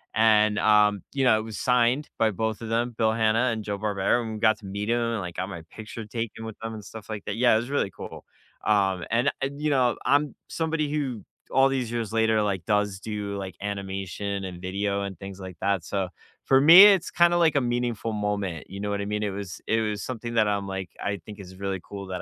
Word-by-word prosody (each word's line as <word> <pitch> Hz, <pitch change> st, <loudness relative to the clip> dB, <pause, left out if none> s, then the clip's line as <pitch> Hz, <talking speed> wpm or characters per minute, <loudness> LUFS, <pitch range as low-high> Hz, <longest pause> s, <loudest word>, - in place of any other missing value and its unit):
and, 110 Hz, -2 st, +4 dB
um, 105 Hz, -2 st, +4 dB
you 135 Hz, -1 st, 0 dB
know, 110 Hz, -3 st, +5 dB
it -, -, -4 dB
was 110 Hz, -1 st, -7 dB
signed 125 Hz, +3 st, +2 dB
by 115 Hz, -, +4 dB
both 110 Hz, +2 st, -2 dB
of 115 Hz, -, -6 dB
them, 120 Hz, +2 st, 0 dB
Bill 110 Hz, -1 st, +2 dB
Hanna 110 Hz, +2 st, +2 dB
and 110 Hz, -1 st, -3 dB
Joe 100 Hz, -1 st, -4 dB
Barbera, 105 Hz, +3 st, +1 dB
and 110 Hz, -1 st, -5 dB
we 105 Hz, -, -6 dB
got 110 Hz, -1 st, +3 dB
to 105 Hz, -, -13 dB
meet 100 Hz, +2 st, -4 dB
'em, 120 Hz, -, +2 dB, 0.2 s
and 105 Hz, -, -3 dB
I 90 Hz, -, -5 dB
got 95 Hz, +3 st, -4 dB
my 85 Hz, -5 st, -7 dB
picture 110 Hz, 0 st, -8 dB
taken 115 Hz, 0 st, -5 dB
with 110 Hz, -1 st, -8 dB
them, 115 Hz, 0 st, -4 dB
and 105 Hz, -2 st, -9 dB
stuff 110 Hz, +1 st, -10 dB
like 105 Hz, -2 st, -5 dB
that. 100 Hz, -, -3 dB
Yeah, 120 Hz, -1 st, +5 dB
it -, -, +5 dB
was 120 Hz, +3 st, -3 dB
really 140 Hz, -8 st, +1 dB
cool. 90 Hz, -, -9 dB, 0.4 s
Um, 95 Hz, -4 st, +2 dB
and 120 Hz, +4 st, +2 dB
I'd 140 Hz, +1 st, -3 dB
you 155 Hz, -, +1 dB
know, 125 Hz, -3 st, +2 dB
I'm 145 Hz, +1 st, +2 dB
somebody 160 Hz, -2 st, -1 dB
who 135 Hz, -8 st, -2 dB, 0.3 s
all 135 Hz, 0 st, +5 dB
these 130 Hz, -4 st, -2 dB
years 115 Hz, -2 st, -3 dB
later, 110 Hz, -1 st, +3 dB
like, 100 Hz, -4 st, -1 dB
does 105 Hz, -2 st, 0 dB
do, 105 Hz, -2 st, -4 dB
like, 95 Hz, -3 st, -6 dB
animation, 100 Hz, 0 st, -4 dB
and 90 Hz, -2 st, -7 dB
video, 100 Hz, +2 st, -1 dB
and 100 Hz, -2 st, -6 dB
things 95 Hz, -1 st, -8 dB
like 95 Hz, -2 st, -8 dB
that, 100 Hz, -3 st, +1 dB
so, 95 Hz, -1 st, -2 dB, 0.4 s
for 135 Hz, 0 st, +5 dB
me, 165 Hz, +7 st, +11 dB
it's 195 Hz, -4 st, +5 dB
kinda 175 Hz, +1 st, +4 dB
like 165 Hz, -3 st, +3 dB
a 140 Hz, -, +4 dB
meaningful 120 Hz, -2 st, -1 dB
moment, 100 Hz, -5 st, -3 dB
you 100 Hz, -, -7 dB
know 105 Hz, 0 st, -3 dB
what 100 Hz, 0 st, -1 dB
I -, -, -3 dB
mean? 105 Hz, +1 st, -2 dB
It 105 Hz, -, 0 dB
was 95 Hz, -2 st, -7 dB
It 110 Hz, 0 st, +2 dB
was 105 Hz, -2 st, -2 dB
something 120 Hz, -1 st, -5 dB
that 110 Hz, -2 st, +4 dB
I'm 100 Hz, -1 st, -1 dB
like, 95 Hz, -2 st, -5 dB
I 100 Hz, 0 st, -1 dB
think 105 Hz, -1 st, -10 dB
is 95 Hz, -1 st, -10 dB
really 95 Hz, -1 st, -3 dB
cool 100 Hz, -1 st, -8 dB
that 90 Hz, -1 st, -4 dB
105 Hz, 245 wpm, -26 LUFS, 100-120 Hz, 0.4 s, me